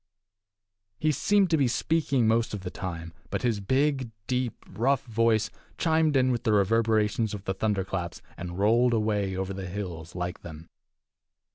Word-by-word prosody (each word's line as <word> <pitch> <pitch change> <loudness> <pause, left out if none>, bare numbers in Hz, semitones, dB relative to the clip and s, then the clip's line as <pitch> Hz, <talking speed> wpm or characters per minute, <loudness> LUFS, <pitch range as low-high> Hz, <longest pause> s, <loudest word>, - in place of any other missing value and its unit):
He 155 +6 +2
seemed 195 - +2
to 160 - +4
be 140 -3 +3
speaking 140 -2 +1
most 115 -1 +2
of 100 - -6
the 90 -1 -5
time, 85 -3 -6 0.2
but - - -3
his 115 -4 +1
big, 130 +4 +1 0.2
deep, 125 -2 -2
rough 130 +9 +1
voice 115 -2 +2 0.3
chimed 160 -2 +2
in 130 0 +3
with 120 -2 -1
the 110 - +2
reverberations 110 +1 +2
of 100 - -8
the 95 - -1
thunder 100 0 0
claps 90 -2 -4 0.2
and 85 0 -6
rolled 115 +4 +4
away 105 -3 0
over 95 +1 -3
the 95 -1 -5
hills 85 -4 -6
like 90 0 -4
them. 80 -1 -10
110 Hz, 165 wpm, -27 LUFS, 95-125 Hz, 0.3 s, to